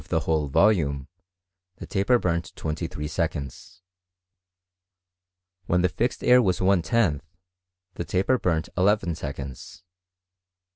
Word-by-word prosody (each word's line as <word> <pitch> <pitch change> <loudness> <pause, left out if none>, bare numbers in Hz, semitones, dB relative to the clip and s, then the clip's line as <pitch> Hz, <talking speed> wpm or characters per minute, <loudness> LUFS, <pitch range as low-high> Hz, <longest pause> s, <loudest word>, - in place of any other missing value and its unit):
i - - -14
the - - +1
whole 80 -2 0
volume 70 -5 +2 0.7
tlie - - -8
taper 105 +5 +2
burnt 85 -6 -2
twenty 80 +2 -3
three 75 -2 -6
se^ 80 +1 0
eonds. 70 +5 -9 1.9
When 90 +1 +2
the 90 - +3
fixed 120 +7 -2
air 125 0 +6
was 95 -6 +1
1 95 -1 +3
lOth, 95 -12 +2 0.7
the - - -4
taper 100 +9 +1
burnt 80 -3 -1
eleven 95 -2 +2
seconds. 70 +1 -8
85 Hz, 130 wpm, -25 LUFS, 75-100 Hz, 1.9 s, air